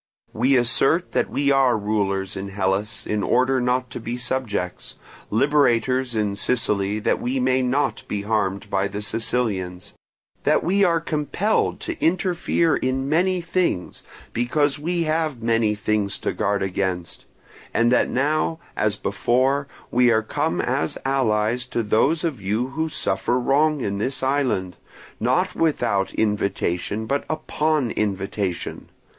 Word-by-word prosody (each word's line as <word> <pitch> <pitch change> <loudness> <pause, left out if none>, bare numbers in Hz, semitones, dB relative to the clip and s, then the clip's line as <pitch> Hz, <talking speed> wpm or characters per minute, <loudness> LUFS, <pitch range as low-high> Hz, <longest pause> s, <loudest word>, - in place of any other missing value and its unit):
We 130 +5 +3
assert 135 +8 +3
that - - 0
we 140 0 +1
are 135 -4 +4
rulers 100 -2 -1
in 95 +1 -5
Hellas 100 +2 -2
in 105 -1 -1
order 130 +4 +2
not 125 +1 0
to - - -5
be 120 +1 -4
subjects; 120 -8 -3 0.3
liberators 130 -1 +2
in 105 -2 0
Sicily 105 -3 +1
that 110 - 0
we 130 +2 -1
may 130 +1 +2
not 130 +3 0
be 100 -1 -3
harmed 100 -2 -1
by 100 +1 +1
the 100 +1 -5
Sicilians; 100 -5 -2 0.5
that - - +3
we 200 +3 +2
are 170 -3 +3
compelled 160 +7 0
to - - -5
interfere 175 -2 +2
in 135 +1 -1
many 180 +3 +2
things, 170 - -1 0.3
because 140 +5 +1
we 170 +3 -1
have 155 -6 -1
many 115 -2 +2
things 105 -1 -1
to - - -2
guard 100 0 0
against; 90 -2 -3 0.5
and 120 +1 +2
that 125 - +3
now, 155 +4 0 0.2
as 110 -1 +1
before, 130 +8 +1 0.2
we 125 0 +4
are 110 -1 +3
come - - -1
as 80 - -1
allies 125 -2 +1
to 120 -2 -1
those 135 +10 +2
of 155 -10 -2
you 110 +7 -1
who 160 +4 -2
suffer 125 -4 0
wrong 145 +3 +2
in 100 -3 -2
this 130 +5 -2
island, 130 -10 0 0.4
not 175 - +1
without 100 -11 +1
invitation 105 -1 -1
but 140 +5 -1
upon 155 -3 0
invitation. 100 -2 -3
120 Hz, 140 wpm, -23 LUFS, 105-140 Hz, 0.5 s, are